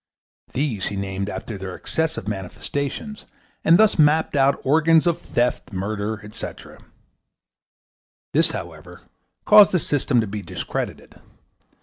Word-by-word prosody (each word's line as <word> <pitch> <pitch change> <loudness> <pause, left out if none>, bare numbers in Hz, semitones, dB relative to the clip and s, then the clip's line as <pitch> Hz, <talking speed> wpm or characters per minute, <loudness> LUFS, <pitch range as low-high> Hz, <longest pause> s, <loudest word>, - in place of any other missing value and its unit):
These 130 -8 -1
he 100 - -4
named 95 0 -3
after 105 -1 -6
their 95 -1 -6
excessive 160 -10 -2
manifestations, 140 - -5 0.4
and 165 +2 +6
thus 215 -4 +4
mapped 155 +1 +3
out 140 0 +3
organs 160 +3 +4
of 170 -1 +1
theft, 120 -3 -1
murder, 105 +2 -3
etc. 105 - -9 1.5
This, - - +4
however, - - -8 0.4
caused 210 -2 +7
the - - +4
system 145 -5 0
to 115 - +1
be 105 0 -5
discredited. - - -6
130 Hz, 120 wpm, -22 LUFS, 100-160 Hz, 1.5 s, caused